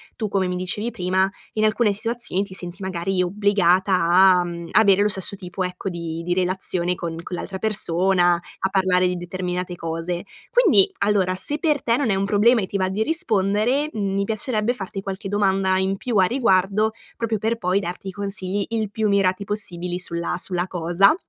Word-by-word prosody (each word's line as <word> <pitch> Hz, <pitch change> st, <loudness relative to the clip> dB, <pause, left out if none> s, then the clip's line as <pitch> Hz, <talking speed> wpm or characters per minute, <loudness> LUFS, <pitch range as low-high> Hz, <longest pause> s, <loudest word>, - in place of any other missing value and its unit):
tu, 215 Hz, -, -3 dB
come 195 Hz, -2 st, 0 dB
mi 180 Hz, -, -2 dB
dicevi 205 Hz, +6 st, -3 dB
prima, 185 Hz, 0 st, +1 dB, 0.3 s
in 215 Hz, -, 0 dB
alcune 215 Hz, 0 st, +2 dB
situazioni 225 Hz, -2 st, -2 dB
ti 195 Hz, -2 st, -10 dB
senti, 180 Hz, +1 st, -3 dB
magari, 185 Hz, 0 st, -1 dB
obbligata 190 Hz, -1 st, +2 dB
a, 180 Hz, +1 st, +5 dB
mhmm, 170 Hz, -1 st, -6 dB
avere 200 Hz, -2 st, +5 dB
lo 210 Hz, -, +3 dB
stesso 195 Hz, 0 st, -2 dB
tipo, 185 Hz, 0 st, -5 dB
ecco, 180 Hz, +2 st, -4 dB
di 165 Hz, -1 st, -5 dB
di 175 Hz, +1 st, -1 dB
relazione 180 Hz, -1 st, 0 dB
con 170 Hz, -1 st, -5 dB
con 180 Hz, -, -5 dB
l'altra 190 Hz, +2 st, -5 dB
persona, 185 Hz, -3 st, +2 dB, 0.2 s
a 190 Hz, -, 0 dB
parlare 185 Hz, -1 st, +2 dB
di 180 Hz, 0 st, -2 dB
determinate 180 Hz, 0 st, -4 dB
cose. 165 Hz, +2 st, -4 dB, 0.3 s
Quindi, 375 Hz, -, +5 dB
allora, 200 Hz, -3 st, +2 dB
se 290 Hz, +11 st, -1 dB
per 300 Hz, -3 st, +1 dB
te 230 Hz, 0 st, +2 dB
non 255 Hz, -4 st, 0 dB
è 195 Hz, -, +2 dB
un 195 Hz, -, 0 dB
problema 215 Hz, +4 st, +4 dB
e 190 Hz, -, -1 dB
ti -, -, -9 dB
va 190 Hz, -1 st, +1 dB
di 205 Hz, +3 st, 0 dB
rispondere, 230 Hz, 0 st, +1 dB
mhmm, 200 Hz, -2 st, -2 dB
mi 200 Hz, -, 0 dB
piacerebbe 220 Hz, +2 st, 0 dB
farti 195 Hz, -3 st, -6 dB
qualche 195 Hz, +1 st, -6 dB
domanda 195 Hz, -2 st, +1 dB
in 190 Hz, +1 st, 0 dB
più 230 Hz, +1 st, -2 dB
a 185 Hz, -, +5 dB
riguardo, 210 Hz, -2 st, +2 dB, 0.2 s
proprio 225 Hz, -2 st, -1 dB
per 225 Hz, +3 st, -1 dB
poi 185 Hz, -1 st, +1 dB
darti 185 Hz, +1 st, -6 dB
i -, -, -5 dB
consigli 195 Hz, 0 st, -1 dB
il 220 Hz, -3 st, -2 dB
più 220 Hz, 0 st, 0 dB
mirati 200 Hz, -1 st, +1 dB
possibili 180 Hz, -4 st, -2 dB
sulla 170 Hz, -1 st, -2 dB
sulla 180 Hz, 0 st, 0 dB
cosa. 175 Hz, -, +3 dB
190 Hz, 190 wpm, -22 LUFS, 180-210 Hz, 0.3 s, a